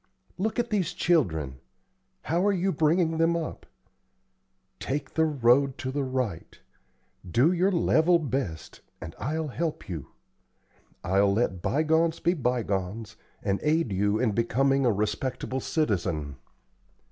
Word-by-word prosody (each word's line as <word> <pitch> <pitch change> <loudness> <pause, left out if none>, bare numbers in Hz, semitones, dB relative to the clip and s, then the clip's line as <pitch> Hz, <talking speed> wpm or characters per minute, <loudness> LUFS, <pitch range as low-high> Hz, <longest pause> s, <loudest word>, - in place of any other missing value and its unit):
Look 220 +4 -1
at 240 -1 -1
these 185 -5 0
children. 80 - 0 0.6
How 170 +3 0
are - - +4
you 190 0 0
bringing 160 +1 +2
them 165 +1 +3
up? 160 -2 -6 1.1
Take 140 +3 -4
the 160 - +3
road 135 -2 +3
to 130 - -4
the 145 +1 -1
right. 130 -9 -3 0.7
Do 125 - +4
your 185 +2 +2
level 170 -1 +3
best, 135 - -4 0.2
and 80 - -8
I'll 155 +2 -2
help 160 +4 -3
you. 80 -7 -6 1.0
I'll 100 +2 +3
let 100 -4 0
bygones 160 - +1
be 175 - +2
bygones, 110 - -2 0.3
and 100 -1 0
aid 155 -5 +1
you 100 +2 +1
in 115 -1 +1
becoming 130 +5 +2
a - - +4
respectable 125 +5 -2
citizen." 85 - -1
135 Hz, 130 wpm, -27 LUFS, 105-165 Hz, 1.1 s, are